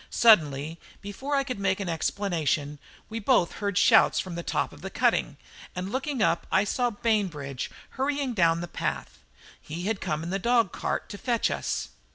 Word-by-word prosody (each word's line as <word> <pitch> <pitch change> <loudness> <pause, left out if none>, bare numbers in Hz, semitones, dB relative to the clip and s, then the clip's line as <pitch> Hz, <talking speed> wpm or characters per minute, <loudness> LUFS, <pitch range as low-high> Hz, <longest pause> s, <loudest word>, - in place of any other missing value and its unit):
Suddenly, 160 -7 +4 0.2
before 265 +9 -4
I 275 - +2
could 255 -5 -5
make 190 -1 +1
an 200 - -3
explanation, 160 -4 -1 0.3
we 225 +1 -5
both 225 -5 +3
heard 200 -2 -1
shouts - - +5
from 185 - -4
the 170 - -4
top - - -1
of - - -14
the - - -5
cutting, - - +1 0.4
and 185 +2 -4
looking 265 -2 -1
up 170 - +1
I 190 - +4
saw 245 +4 0
Bainbridge 190 - -1 0.2
hurrying 275 -1 -1
down 170 -4 +3
the 175 - -4
path. - - -4 0.4
He 165 +3 -6
had 205 +1 -1
come 155 +1 -2
in 170 - -4
the 195 - -1
dog 235 -3 +2
cart - - -3
to 205 - -8
fetch 235 -3 +1
us. - - -2
195 Hz, 185 wpm, -27 LUFS, 170-235 Hz, 0.4 s, shouts